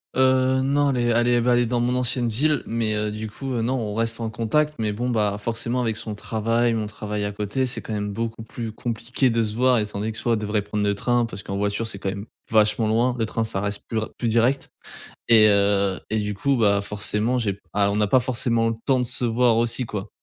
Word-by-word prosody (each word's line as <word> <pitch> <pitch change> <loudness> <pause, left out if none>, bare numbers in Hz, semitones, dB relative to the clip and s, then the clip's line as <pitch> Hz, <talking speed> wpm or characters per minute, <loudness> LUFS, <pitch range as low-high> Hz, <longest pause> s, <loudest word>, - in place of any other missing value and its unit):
Heu, 130 0 +3
non, 140 +1 +2
elle 130 - -1
est 120 - +1
elle 120 +1 +2
est, 120 0 +3
bah, 125 +1 +3
elle 120 0 +3
est - - 0
dans 120 +1 0
mon 125 +1 +1
ancienne 125 -1 +1
ville 145 +5 +1
mais 115 -2 -1
heu, 105 0 -1
du 110 +1 -5
coup, 135 +5 -5
heu, 115 - 0
non, 125 +3 0
on 110 -5 -3
reste 115 +1 0
en 115 - -2
contact. 130 +8 0
Mais 105 -2 0
bon 120 +4 -2
bah, 105 -4 +1
forcément 115 +3 -2
avec 110 -2 -1
son 110 -1 -4
travail, 115 +3 0
mon 110 -1 -1
travail 105 -1 -4
à 105 - -2
côté, 105 +6 -2
c'est 125 - -2
quand 110 - -6
même 105 -1 -3
beaucoup 115 +1 -4
plus 115 0 -6
compliqué 120 +3 -1
de 115 -1 +1
se 105 0 -3
voir 125 0 +3
étant 105 -1 -3
donné 110 +2 -2
que 110 - -6
soit 115 +1 0
elle 110 - 0
devrait 105 0 -1
prendre 105 +1 -3
le 100 0 +1
train, 120 +3 +1
parce 100 -4 -7
qu'en 100 - -4
voiture 105 +2 -1
c'est 100 -3 -6
quand 100 - -2
même 100 +1 -5 0.2
vachement 110 0 +3
loin, 120 +3 +2
le 115 - +1
train 115 +1 -2
ça 110 -3 -2
reste 100 +1 -3
plus 115 - -3
ra 110 0 -2
plus 120 - -1
direct. 120 +5 +1 0.6
Et 110 -2 +7
heu, 100 -1 +2
et 110 - +1
du 105 0 -2
coup 135 +7 +1
bah, 100 -3 +3
forcément 105 +4 -1
j'ai 110 -4 0
p 100 - -20
ah, 100 -1 +2
on 100 - -1
n'a 105 0 +2
pas 130 +5 +4
forcément 115 -2 +1
le 115 - -1
temps 130 -2 +3
de - - +1
se 125 +1 -1
voir 115 0 +3
aussi 120 +2 0
quoi. 105 -4 -5
115 Hz, 265 wpm, -23 LUFS, 105-120 Hz, 0.6 s, Et